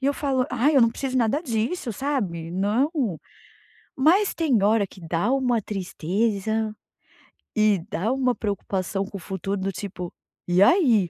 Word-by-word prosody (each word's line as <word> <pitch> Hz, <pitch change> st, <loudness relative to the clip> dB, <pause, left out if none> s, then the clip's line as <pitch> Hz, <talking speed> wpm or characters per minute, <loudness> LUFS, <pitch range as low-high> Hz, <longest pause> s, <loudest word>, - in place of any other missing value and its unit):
E 270 Hz, -, -1 dB
eu 285 Hz, -, +2 dB
falo: 265 Hz, -3 st, 0 dB
“Ai, 260 Hz, +4 st, +2 dB
eu -, -, +7 dB
não 230 Hz, -, +6 dB
preciso 260 Hz, +2 st, -3 dB
nada 250 Hz, +5 st, +2 dB
disso, 235 Hz, +1 st, -2 dB
sabe. 195 Hz, -, -2 dB
Não". 205 Hz, -, +1 dB, 1.1 s
Mas 350 Hz, +9 st, +4 dB
tem 280 Hz, -10 st, +2 dB
hora 210 Hz, 0 st, +3 dB
que 190 Hz, 0 st, -15 dB
dá 170 Hz, +8 st, 0 dB
uma 250 Hz, -4 st, +1 dB
tristeza. 210 Hz, +3 st, -1 dB, 0.8 s
E 215 Hz, -2 st, +4 dB
dá 210 Hz, +2 st, -1 dB
uma 255 Hz, -2 st, +1 dB
preocupação 195 Hz, -2 st, -2 dB
com 200 Hz, -, -8 dB
o -, -, -8 dB
futuro, 195 Hz, +2 st, -4 dB
do 195 Hz, +1 st, -1 dB
tipo: 185 Hz, -2 st, -6 dB, 0.4 s
“E 180 Hz, +2 st, +5 dB
aí?”. 230 Hz, -, +4 dB
220 Hz, 155 wpm, -24 LUFS, 195-260 Hz, 1.1 s, eu